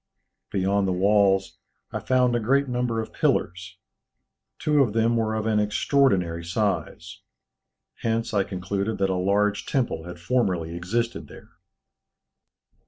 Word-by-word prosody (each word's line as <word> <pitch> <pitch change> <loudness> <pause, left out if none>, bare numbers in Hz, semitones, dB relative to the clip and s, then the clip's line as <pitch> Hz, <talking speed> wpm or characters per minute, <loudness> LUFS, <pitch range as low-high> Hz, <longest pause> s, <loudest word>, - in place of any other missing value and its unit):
Beyond 100 0 +1
the - - +1
walls, 95 0 +2 0.3
I - - -3
found 125 -2 +2
a - - +2
great 135 +5 +2
number 125 -2 -1
of 110 - -5
pillars; 90 0 -1 0.8
two 150 -1 +2
of 120 -7 +1
them 115 +1 +2
were 110 -1 0
of 110 -1 -2
an 110 -1 +2
extraordinary 105 - +1
size. 95 0 -3 0.8
Hence 115 0 -2
I 100 -2 +3
concluded 100 +3 -3
that 95 0 +1
a - - 0
large 100 +3 +1
temple 120 - -1
had 90 0 -8
formerly 90 -6 -1
existed 115 +7 -2
there." - - -14
105 Hz, 135 wpm, -25 LUFS, 95-115 Hz, 0.8 s, I